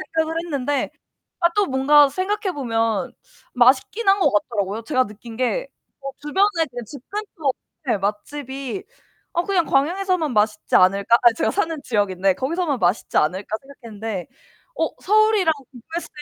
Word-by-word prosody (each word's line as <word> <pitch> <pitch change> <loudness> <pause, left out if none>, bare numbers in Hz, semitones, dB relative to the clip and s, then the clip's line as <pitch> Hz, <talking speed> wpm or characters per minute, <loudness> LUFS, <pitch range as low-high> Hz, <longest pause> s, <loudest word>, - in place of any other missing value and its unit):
생각을 320 0 +1
했는데 285 -3 -1 0.5
아 340 -1 +4
또 410 -1 +3
뭔가 280 +1 +5
생각해보면 275 - -1 0.4
맛있긴 260 - +3
한 390 +1 +5
거 - - +3
같더라고요. 205 0 -1
제가 255 -1 +1
느낀 220 +2 -11
게 - - 0 0.3
뭐 275 0 -5
주변에 330 +4 +1
그냥 240 -2 -6
집 270 +3 -10
근처 390 -9 -2 0.4
네 225 - +2
맛집이 265 - -4 0.5
'어 345 - +1
그냥 370 -3 +1
광양에서만 340 +2 +1
맛있지 210 0 +1
않을까?' 200 +5 +5
아 240 -2 +6
제가 - - 0
사는 325 -6 -1
지역인데 195 -4 +1
거기서만 295 -1 -1
맛있지 180 +5 +1
않을까 190 +7 0
생각했는데 225 -8 -7 0.5
어 - - 0
서울이랑 430 -4 +4 0.2
공부했을 320 +8 -7
270 Hz, 335 characters per minute, -22 LUFS, 225-340 Hz, 0.5 s, 아